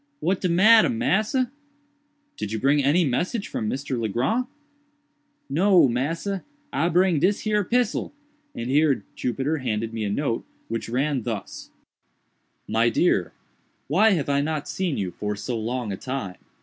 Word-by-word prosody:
"What 185 +1 0
de 185 - +1
matter, 215 +8 +6
massa?" 245 +1 +1 0.8
"Did 105 - -5
you 110 - -2
bring 140 +4 +3
any 160 +6 +3
message 180 - -1
from 110 - -3
Mr. 135 -2 -3
Legrand?" 130 - 0 1.0
"No, 175 +3 +4
massa, 165 +10 -2 0.3
I 170 - +1
bring 180 -2 +3
dis 190 +6 +2
here 210 -1 +1
pissel;" 240 +3 0 0.4
and 115 - -4
here 145 -1 +3
Jupiter 135 +5 -1
handed 115 -3 -2
me 110 -1 -3
a 105 - -1
note 115 +2 -1 0.3
which 115 0 -3
ran 135 +2 0
thus: 110 -3 -6 1.0
"MY 115 +2 +2
DEAR 95 - +2 0.6
——Why 205 +9 +4
have 155 -6 -1
I 140 0 +2
not 150 0 -2
seen 185 -6 -2
you 95 -3 -2
for 105 +2 -4
so 120 +4 -4
long 115 0 -3
a 95 - -4
time? 125 -9 -5
140 Hz, 150 wpm, -24 LUFS, 115-185 Hz, 1.0 s, matter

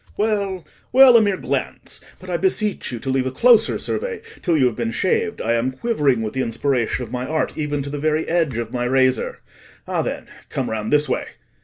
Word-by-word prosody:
Well, 200 -5 -1 0.3
well, 260 -1 +8
a 230 - +8
mere 200 -3 +1
glance; - - -3 0.2
but - - -13
I - - -2
beseech 215 - 0
you 120 - -4
to 135 +4 -6
leave 130 -1 +1
a - - -2
closer 230 - +4
survey 465 -3 -4 0.2
till 170 -4 +2
you 135 - +4
have 120 -3 +1
been 120 -2 -2
shaved: 200 - 0
I 115 - +1
am 120 +3 0
quivering 140 - +1
with 110 - -4
the 130 - -1
inspiration 125 0 -1
of 115 - -14
my 125 0 -3
art 155 +2 -1
even 145 -2 -2
to 140 - -6
the 145 - -4
very 155 +1 0
edge 160 -8 +1
of 115 -1 -4
my 125 -1 -2
razor. 130 0 +1 0.5
Ah, - - 0
then, - - -4 0.2
come - - -3
round 110 -1 -3
this 150 0 +3
way." - - -1
145 Hz, 215 wpm, -21 LUFS, 125-200 Hz, 0.5 s, well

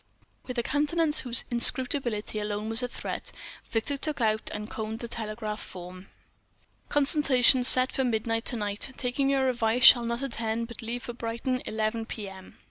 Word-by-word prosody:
With 250 -1 -6
a 235 - 0
countenance 300 +3 +2
whose 245 -1 -2
inscrutability 240 -3 +2
alone 210 +1 -4
was 225 +1 -1
a 250 - -2
threat, - - -6 0.4
Victor 250 +5 -2
took 300 +1 -3
out 220 -2 0
and 210 0 -6
conned 220 0 -6
the 235 - -7
telegraph 215 -1 -6
form. 185 +1 -11 0.8
"CONSULTATION 275 -4 +4
SET 255 +1 +7
FOR 265 - -2
MIDNIGHT 225 -1 -2
TO 245 - 0
NIGHT 210 +4 -3
TAKING 265 +2 -1
YOUR 270 -1 +1
ADVICE 235 -1 0
SHALL 240 -3 +8
NOT 235 +3 -3
ATTEND 230 -3 -3
BUT 235 - -10
LEAVE 235 +2 -5
FOR 240 - -7
BRIGHTON 235 +2 -4
ELEVEN 220 +1 -3
P.M." 195 -4 -9
235 Hz, 165 wpm, -27 LUFS, 220-255 Hz, 0.8 s, SHALL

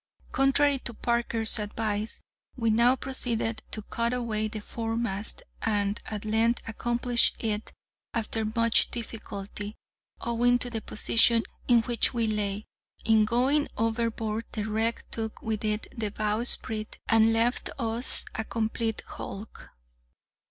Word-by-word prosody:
Contrary 275 +1 +3
to 240 -2 -5
Parker's 235 -2 +1
advice, 210 +1 -2 0.4
we 230 -2 +2
now 235 +3 +5
proceeded 235 -4 -2
to 215 - -3
cut 235 +3 -1
away 225 -3 -1
the 215 0 -5
foremast, 225 -1 -3 0.2
and 205 -2 0
at 210 -1 -5
length 225 +2 +2
accomplished 240 +1 +2
it 215 -1 -2 0.4
after 225 -1 -1
much 230 +1 +4
difficulty, 210 -2 -6 0.4
owing 240 +1 +2
to 245 0 -1
the 225 -2 -3
position 230 +2 +3 0.2
in 240 -2 +6
which 240 0 +2
we 230 -1 +1
lay. 210 -1 -1 0.4
In 220 -1 +5
going 260 +6 +2
overboard 225 0 -1
the 215 - -2
wreck 220 +2 -1
took 220 -1 -4
with 220 -1 -2
it 215 0 -1
the 220 -3 -2
bowsprit, 215 +1 -1
and 225 0 +5
left 230 +2 +1
us 235 -1 +4
a 220 - -2
complete 225 0 -2
hulk. 205 +3 -8
225 Hz, 130 wpm, -28 LUFS, 215-235 Hz, 0.4 s, in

